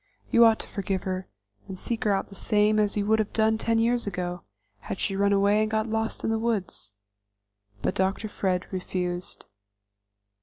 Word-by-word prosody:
You 235 0 +7
ought 225 -1 +5
to - - -9
forgive 195 -2 -3
her, 185 0 -3 0.4
and 190 - -7
seek 230 +4 -3
her 210 - +3
out 195 - 0
the 195 - -12
same 210 +1 +2
as 210 0 +1
you 200 - 0
would 220 +1 +3
have 215 - -1
done 220 0 +2
ten 230 0 +1
years 235 0 +1
ago, 180 -2 -3 0.4
had 190 - -6
she 195 - -1
run 200 +1 +2
away 200 +1 +4
and 215 - +1
got 220 0 0
lost 220 0 -2
in - - 0
the 225 - 0
woods." 200 - -2 0.9
But - - +1
Dr. 190 +3 0
Fred 185 -3 -1
refused. 180 -1 -4
205 Hz, 190 wpm, -26 LUFS, 190-220 Hz, 0.9 s, You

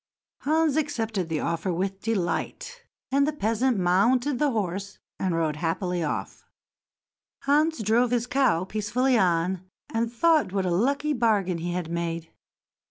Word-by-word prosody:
Hans 310 0 +2
accepted 225 - -1
the 160 -2 -1
offer 170 +2 -1
with 190 +3 -2
delight, 225 - -3 0.3
and 280 +1 +3
the - - +1
peasant 235 -2 0
mounted 235 +9 +2
the 295 - +3
horse 200 -3 -3 0.2
and 185 -3 0
rode 160 -2 0
rapidly 175 +1 -1
off. 150 - -4 1.0
Hans 295 -2 +2
drove 235 +4 +3
his 240 -1 +1
cow 250 -10 +2
peacefully 220 +6 0
on, 180 -2 +2 0.3
and 230 0 0
thought 310 - +3
what 195 -2 0
a 180 - 0
lucky 280 +11 +1
bargain 205 -8 +1
he 175 +1 -3
had 175 -2 -3
made. 170 -1 -3
210 Hz, 145 wpm, -26 LUFS, 175-260 Hz, 1.0 s, and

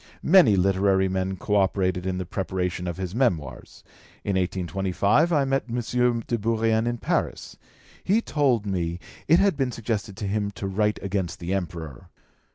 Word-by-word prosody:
Many 170 - +6
literary 95 0 +2
men 95 0 -2
co 105 - -1
operated 95 -2 +1
in 95 -1 -1
the 95 - -3
preparation 90 -1 -3
of 85 - -4
his 95 -1 -4
Memoirs. 85 - -2 0.4
In 100 - -1
1825 95 - +1
I 145 -4 +3
met 135 0 0
M. 120 0 0
de 120 - -1
Bourrienne 115 +1 +1
in 120 0 -1
Paris. - - -2 0.5
He 205 +4 +3
told 135 - +1
me 85 -4 -2 0.3
it 165 - +6
had 195 -2 +3
been 135 -3 -1
suggested 105 -4 -4
to 110 - -4
him 100 0 -1
to - - -4
write 105 +2 0
against 95 -3 -2
the 90 +2 -3
Emperor. 85 -8 -5
100 Hz, 165 wpm, -25 LUFS, 95-120 Hz, 0.5 s, Many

